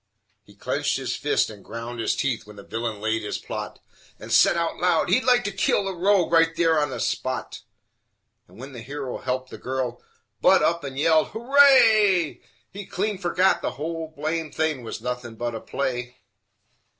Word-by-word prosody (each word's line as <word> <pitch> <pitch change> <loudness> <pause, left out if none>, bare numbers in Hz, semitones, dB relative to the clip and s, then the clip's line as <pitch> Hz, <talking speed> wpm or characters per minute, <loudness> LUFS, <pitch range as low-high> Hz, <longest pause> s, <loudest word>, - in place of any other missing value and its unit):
He - - -20
clinched - - -1
his - - -3
fists - - +1
and 100 -2 -13
ground 115 +1 -7
his 115 - 0
teeth 125 -6 -2
when 105 - -12
the 100 - -11
villain 115 -1 -4
laid 110 +1 -1
his 105 - -4
plot - - -6 0.4
And - - -9
said - - +5
out 170 -1 -1
loud 175 -2 +1
he'd 225 +8 +3
like 250 -1 +4
to 205 - -2
kill 195 +1 +1
the 195 - -2
rogue 185 0 +2
right 165 0 +3
on 160 -3 +3
the 130 - -5
spot, 130 -2 -3 0.9
And - - -19
when 135 +3 -9
the 120 -3 -9
hero 135 +1 -6
helped 130 0 -3
the - - -9
girl, 130 -2 -3 0.4
Budd - - +5
up 170 -1 +1
and 135 -1 -6
yelled 155 +1 +3
"Hooray!" 220 - +4 0.3
He'd 200 0 -8
clean 205 +1 -2
fergot 185 +1 +2
the - - -3
whole 160 +1 -5
blame 155 +1 -2
thing 155 -3 -1
was 115 -1 -7
nothing 125 -2 -5
but 120 +1 -3
a 115 - -4
play. 125 -2 -4
150 Hz, 185 wpm, -24 LUFS, 125-180 Hz, 0.9 s, said